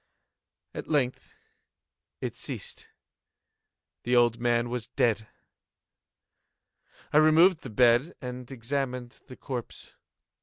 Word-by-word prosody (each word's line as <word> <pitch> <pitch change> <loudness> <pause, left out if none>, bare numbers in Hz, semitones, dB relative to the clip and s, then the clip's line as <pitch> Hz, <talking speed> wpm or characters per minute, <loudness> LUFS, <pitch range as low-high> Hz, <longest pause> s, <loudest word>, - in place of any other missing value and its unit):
At - - -6
length 135 -5 -1 0.9
it - - -4
ceased. - - -8 1.1
The 125 +1 0
old 120 -1 +4
man 120 0 +1
was 120 -2 -4
dead. 110 -2 0 1.9
I - - +5
removed 155 +3 +6
the 130 - -8
bed 120 +7 +3
and 125 -1 -7
examined 125 -1 -4
the 130 - -11
corpse. 125 -4 -7
125 Hz, 100 wpm, -28 LUFS, 120-140 Hz, 1.9 s, removed